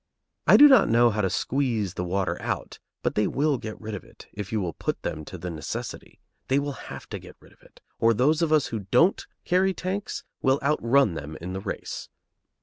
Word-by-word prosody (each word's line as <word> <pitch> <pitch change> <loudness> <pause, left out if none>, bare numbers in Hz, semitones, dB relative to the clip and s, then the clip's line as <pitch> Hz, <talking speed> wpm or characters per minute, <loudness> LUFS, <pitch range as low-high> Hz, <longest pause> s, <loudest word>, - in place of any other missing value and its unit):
I - - +8
do 295 - +10
not 265 -4 +6
know 120 +1 +5
how 105 0 -1
to 95 - +1
squeeze 115 -6 -1
the 90 - -3
water 95 +1 -1
out, - - -4 0.2
but - - 0
they 105 - +2
will 145 -1 +1
get 110 -1 -7
rid 110 0 -6
of 95 - -6
it, - - -16
if 100 -2 -6
you 110 - 0
will 90 -4 -2
put - - -4
them 75 - -3
to 90 - -8
the 90 +1 -5
necessity. 75 -3 -6 0.3
They 135 - +2
will 145 0 0 0.2
have - - -8
to - - -5
get - - -14
rid - - -19
of - - -29
it, - - -21 0.2
or 115 - +5
those 150 +8 +3
of 165 -2 +1
us 155 -3 +4
who 110 - -1
don't 165 - +3 0.2
carry 185 +1 +2
tanks 195 +2 -4 0.2
will 135 +1 +3
outrun 140 - +3
them 75 0 -6
in 90 +2 -6
the 95 - -4
race. 100 - -5
115 Hz, 225 wpm, -26 LUFS, 95-145 Hz, 0.3 s, do